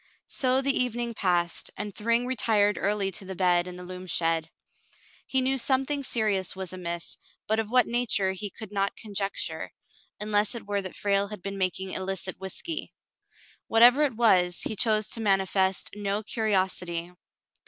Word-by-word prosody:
So 260 Hz, 0 st, +3 dB
the 275 Hz, 0 st, +2 dB
evening 240 Hz, -1 st, 0 dB
passed, 175 Hz, -4 st, 0 dB
and 205 Hz, 0 st, -4 dB
Thryng 230 Hz, +3 st, +1 dB
retired 215 Hz, -5 st, +2 dB
early 200 Hz, -1 st, 0 dB
to 190 Hz, -, -3 dB
the 190 Hz, 0 st, -7 dB
bed 180 Hz, -1 st, +2 dB
in 180 Hz, -, -7 dB
the 180 Hz, -, -9 dB
loom 185 Hz, +1 st, -8 dB
shed. 165 Hz, -1 st, +1 dB, 0.8 s
He 265 Hz, -, +1 dB
knew 265 Hz, +1 st, +2 dB
something 270 Hz, +3 st, +1 dB
serious 210 Hz, -8 st, 0 dB
was 190 Hz, -1 st, -5 dB
amiss, 170 Hz, -2 st, -5 dB, 0.3 s
but 220 Hz, +1 st, +1 dB
of 220 Hz, -1 st, -2 dB
what 250 Hz, -1 st, +5 dB
nature 230 Hz, -5 st, +1 dB
he 195 Hz, +2 st, -5 dB
could 215 Hz, +1 st, -10 dB
not 200 Hz, -1 st, -1 dB
conjecture, 200 Hz, -2 st, -3 dB, 0.5 s
unless 210 Hz, +2 st, +1 dB
it 235 Hz, -, -7 dB
were 200 Hz, 0 st, -1 dB
that 185 Hz, -1 st, -7 dB
Frale 200 Hz, 0 st, +1 dB
had 205 Hz, -3 st, -9 dB
been 195 Hz, 0 st, -5 dB
making 185 Hz, 0 st, -1 dB
illicit 190 Hz, -1 st, -4 dB
whiskey. 310 Hz, -, -5 dB, 0.7 s
What 225 Hz, +1 st, +5 dB
ever 250 Hz, +5 st, +8 dB
it 280 Hz, -5 st, +1 dB
was, 185 Hz, -6 st, +3 dB
he 220 Hz, -, -2 dB
chose 215 Hz, 0 st, +2 dB
to 230 Hz, -, -2 dB
manifest 195 Hz, -2 st, +1 dB
no 205 Hz, +1 st, -2 dB
curiosity. 185 Hz, -6 st, -1 dB
200 Hz, 165 wpm, -27 LUFS, 185-230 Hz, 0.8 s, ever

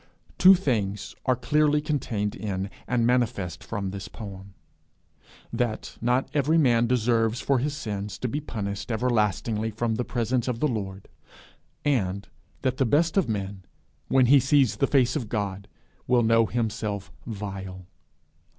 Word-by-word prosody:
Two 190 Hz, +1 st, +9 dB
things 105 Hz, -, -1 dB
are 130 Hz, -, +4 dB
clearly 150 Hz, +4 st, +2 dB
contained 120 Hz, -9 st, -2 dB
in, 100 Hz, -2 st, -4 dB, 0.2 s
and 120 Hz, -2 st, +1 dB
manifest 110 Hz, -9 st, 0 dB
from 100 Hz, -4 st, -4 dB
this 100 Hz, -1 st, -6 dB
poem: 100 Hz, -2 st, -9 dB, 1.0 s
that 120 Hz, -3 st, -2 dB
not 125 Hz, +3 st, +1 dB
every 150 Hz, +2 st, +2 dB
man 120 Hz, -6 st, +4 dB
deserves 115 Hz, -1 st, +2 dB
for 135 Hz, -2 st, +1 dB
his 145 Hz, +3 st, -2 dB
sins 105 Hz, -6 st, -4 dB
to 125 Hz, -, -2 dB
be 140 Hz, +5 st, -2 dB
punished 100 Hz, -5 st, -4 dB
everlastingly 110 Hz, -1 st, 0 dB
from 110 Hz, +1 st, -1 dB
the 125 Hz, -, -1 dB
presence 120 Hz, 0 st, -1 dB
of 125 Hz, -2 st, -2 dB
the 150 Hz, -, +2 dB
Lord; 100 Hz, -6 st, -4 dB, 0.8 s
and 100 Hz, -9 st, 0 dB, 0.4 s
that 130 Hz, -1 st, 0 dB
the -, -, +3 dB
best 160 Hz, +6 st, +2 dB
of 190 Hz, -, +2 dB
men, 100 Hz, -2 st, -3 dB, 0.5 s
when 130 Hz, -1 st, +4 dB
he 140 Hz, +3 st, +7 dB
sees 135 Hz, -5 st, +3 dB
the 140 Hz, -, +2 dB
face 125 Hz, -3 st, +3 dB
of 120 Hz, -8 st, -3 dB
God, 100 Hz, -3 st, -3 dB, 0.4 s
will 125 Hz, -1 st, +4 dB
know 115 Hz, 0 st, +4 dB
himself 105 Hz, -4 st, -2 dB, 0.2 s
vile. 95 Hz, -4 st, -6 dB
115 Hz, 150 wpm, -26 LUFS, 100-130 Hz, 1.0 s, Two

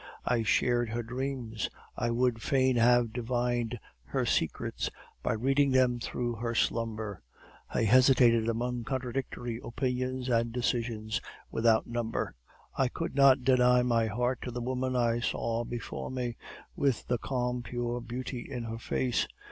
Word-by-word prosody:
I 120 Hz, -2 st, +2 dB
shared 120 Hz, +2 st, +2 dB
her 120 Hz, +1 st, -2 dB
dreams; 125 Hz, -2 st, -3 dB, 0.3 s
I 120 Hz, -, -1 dB
would 120 Hz, -1 st, +1 dB
fain 130 Hz, -1 st, +2 dB
have 120 Hz, -1 st, +4 dB
divined 120 Hz, -1 st, -1 dB, 0.3 s
her -, -, -1 dB
secrets -, -, -1 dB, 0.3 s
by -, -, 0 dB
reading 135 Hz, +5 st, +2 dB
them 130 Hz, -2 st, +3 dB
through 120 Hz, 0 st, -3 dB
her 115 Hz, +1 st, -2 dB
slumber. 110 Hz, -4 st, -1 dB, 0.5 s
I -, -, +1 dB
hesitated 120 Hz, -1 st, +5 dB
among 120 Hz, +1 st, -1 dB
contradictory 125 Hz, -2 st, -3 dB
opinions 130 Hz, +1 st, -2 dB
and 115 Hz, -1 st, +2 dB
decisions 115 Hz, -2 st, -1 dB, 0.3 s
without 115 Hz, -1 st, +3 dB
number. 120 Hz, -1 st, -2 dB, 0.4 s
I 135 Hz, -, +2 dB
could 165 Hz, +6 st, -4 dB
not 135 Hz, -1 st, +6 dB
deny 125 Hz, -1 st, +5 dB
my 115 Hz, -2 st, +2 dB
heart 120 Hz, +4 st, -1 dB
to -, -, -4 dB
the 120 Hz, 0 st, -4 dB
woman 130 Hz, +1 st, -1 dB
I 120 Hz, -1 st, +2 dB
saw 115 Hz, -1 st, -1 dB
before 120 Hz, 0 st, -5 dB
me, 125 Hz, -2 st, -3 dB, 0.4 s
with 135 Hz, -5 st, +1 dB
the 125 Hz, -1 st, 0 dB
calm, 125 Hz, -1 st, -1 dB
pure 120 Hz, 0 st, -3 dB
beauty 125 Hz, +1 st, -5 dB
in 125 Hz, -3 st, -3 dB
her 115 Hz, 0 st, -5 dB
face. 125 Hz, +1 st, 0 dB
120 Hz, 145 wpm, -30 LUFS, 115-125 Hz, 0.5 s, not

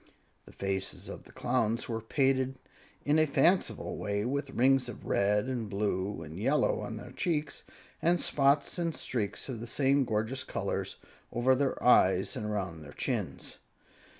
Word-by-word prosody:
The -, -, -12 dB
faces 95 Hz, -1 st, -3 dB
of -, -, -8 dB
the -, -, -15 dB
Clowns 115 Hz, -2 st, 0 dB
were 115 Hz, -1 st, -3 dB
painted 130 Hz, +2 st, +1 dB, 0.5 s
in 150 Hz, +2 st, +4 dB
a 155 Hz, -, +4 dB
fanciful 170 Hz, +7 st, +2 dB
way, 100 Hz, 0 st, -1 dB
with 140 Hz, +2 st, -2 dB
rings 130 Hz, 0 st, +3 dB
of 120 Hz, -, -9 dB
red 105 Hz, +2 st, +2 dB
and 120 Hz, -5 st, -3 dB
blue 100 Hz, -2 st, -1 dB
and 80 Hz, +3 st, -8 dB
yellow -, -, +2 dB
on -, -, -5 dB
their -, -, -9 dB
cheeks, 155 Hz, -4 st, -2 dB, 0.4 s
and 175 Hz, +1 st, +3 dB
spots 140 Hz, +4 st, +2 dB
and 165 Hz, -2 st, -1 dB
streaks 105 Hz, -5 st, -3 dB
of 125 Hz, -5 st, -5 dB
the 120 Hz, -, -6 dB
same 135 Hz, +3 st, +3 dB
gorgeous 115 Hz, +3 st, -1 dB
colors -, -, -3 dB, 0.4 s
over 125 Hz, +2 st, +3 dB
their 135 Hz, +1 st, +1 dB
eyes 95 Hz, -6 st, +4 dB
and 105 Hz, -, -3 dB
around 95 Hz, -6 st, -3 dB
their 75 Hz, -1 st, -11 dB
chins. -, -, -3 dB
120 Hz, 160 wpm, -30 LUFS, 105-135 Hz, 0.5 s, in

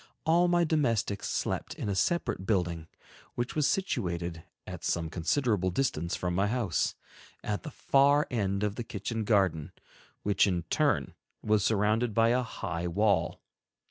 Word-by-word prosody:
All 170 Hz, +2 st, +4 dB
my 175 Hz, 0 st, +3 dB
domestics 120 Hz, -, 0 dB
slept -, -, -2 dB
in -, -, -5 dB
a 100 Hz, -, 0 dB
separate 95 Hz, -, 0 dB
building, 85 Hz, -6 st, 0 dB, 0.5 s
which 120 Hz, 0 st, -2 dB
was 150 Hz, -2 st, +2 dB
situated 85 Hz, -, -2 dB, 0.2 s
at -, -, -8 dB
some 80 Hz, -2 st, -1 dB
considerable 95 Hz, -, +1 dB
distance 85 Hz, -, -1 dB
from 90 Hz, -1 st, -2 dB
my 100 Hz, +3 st, +2 dB
house, 110 Hz, -, 0 dB, 0.5 s
at 105 Hz, -1 st, -2 dB
the 155 Hz, -, -7 dB
far 140 Hz, +1 st, +3 dB
end 100 Hz, -4 st, 0 dB
of 105 Hz, 0 st, -1 dB
the 120 Hz, -, -3 dB
kitchen 110 Hz, +1 st, -4 dB
garden, 95 Hz, -8 st, +1 dB, 0.5 s
which 100 Hz, 0 st, +3 dB
in 90 Hz, -3 st, 0 dB
turn -, -, +1 dB, 0.3 s
was 105 Hz, -1 st, +2 dB
surrounded 110 Hz, +2 st, +1 dB
by 115 Hz, 0 st, +4 dB
a 125 Hz, +2 st, +3 dB
high 90 Hz, -7 st, -4 dB
wall. 100 Hz, +4 st, +1 dB
105 Hz, 150 wpm, -29 LUFS, 90-125 Hz, 0.5 s, All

